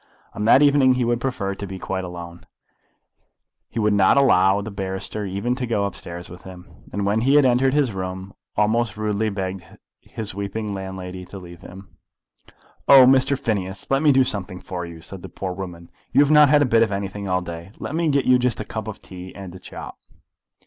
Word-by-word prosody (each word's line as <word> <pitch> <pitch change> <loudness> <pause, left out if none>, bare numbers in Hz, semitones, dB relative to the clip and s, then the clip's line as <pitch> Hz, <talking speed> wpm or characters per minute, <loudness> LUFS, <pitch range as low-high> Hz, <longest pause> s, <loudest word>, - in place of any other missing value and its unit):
On 105 - -3
that 130 +5 +6
evening 140 -3 +5
he 125 -1 0
would 120 0 0
prefer 115 -7 -2
to 100 +1 -7
be 95 0 -7
quite 95 0 -4
alone. 85 -1 -9 1.2
He - - -10
would 105 -2 +2
not 100 +4 +4
allow 95 -8 +4
the 105 +1 -6
barrister 95 +2 -4
even 100 +6 -1
to 125 -1 -3
go 105 -4 0
upstairs 85 -3 -6
with 90 0 -12
him; 90 -1 -14
and 100 0 -2
when 105 +3 +1
he 135 +4 +3
had 145 -2 +6
entered 130 +2 +3
his 140 -5 +2
room, 95 0 -5 0.2
almost 110 0 +1
rudely 110 0 0
begged 95 -2 -4 0.4
his 110 -5 -7
weeping 100 +2 -4
landlady 95 -1 -6
to 90 +2 -10
leave 85 -2 -11
him. 95 +1 -13 0.9
"Oh, 135 -2 +9
Mr. 135 +1 +4
Phineas, 100 -4 -3
let 135 0 +3
me 150 -2 +5
do 135 -1 +5
something 100 -7 -4
for 90 -2 -6
you," 85 -1 -11
said 95 +2 -9
the - - -9
poor 95 -2 -5
woman. 90 -3 -8 0.2
"You - - +5
have 145 +1 +3
not 150 -2 +7
had 145 0 +5
a - - +2
bit 115 -2 +3
of 115 - +2
anything 100 0 -4
all 90 0 +1
day. 85 0 -8
Let - - -6
me 165 +1 0
get 140 -2 +1
you 125 0 +5
just 125 -1 0
a - - -4
cup - - -5
of - - -8
tea 90 0 -10
and 95 -3 -9
a 95 - -10
chop." - - -9
100 Hz, 210 wpm, -22 LUFS, 95-125 Hz, 1.2 s, Oh